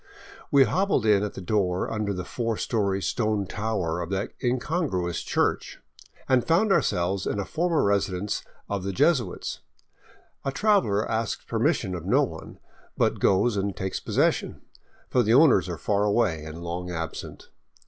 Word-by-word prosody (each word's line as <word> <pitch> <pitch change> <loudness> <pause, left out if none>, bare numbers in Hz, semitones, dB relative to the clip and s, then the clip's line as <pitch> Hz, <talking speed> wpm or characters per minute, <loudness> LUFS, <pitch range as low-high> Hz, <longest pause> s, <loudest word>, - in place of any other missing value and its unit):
We 140 -1 +6
hobbled 170 - +1
in 105 -2 +4
at 105 -1 -4
a - - -5
door 90 -2 0
under 105 -2 -1
the 90 -2 -4
four 115 -3 -2
story 100 -4 -1
stone 105 -4 0
tower 95 -5 -2
of 85 - -5
that 100 +1 -2
incongruous 125 - -1
church, - - -1 0.5
and 130 -2 +3
found 195 +6 +2
ourselves 95 - +1
in - - -1
a 100 - -2
former 170 - 0
residence 100 -1 0 0.2
of 100 -2 -3
the 100 0 -3
Jesuits. 120 - +1 0.8
The 135 - -1
traveler 190 - +2
asks 110 -2 -2
permission 95 - 0
of 85 -3 -6
no - - +4
one, - - -7 0.4
but - - +1
goes 105 +4 +3
and 100 -1 -1
takes 95 0 -3
possession; - - 0 0.5
for 125 - +2
the 115 0 +3
owners 130 - +5
are 85 - -4
far 100 +5 0
away 100 -7 +1
and 80 +2 -8
long 90 +1 -4
absent. 80 -2 -6
100 Hz, 160 wpm, -26 LUFS, 90-120 Hz, 0.8 s, We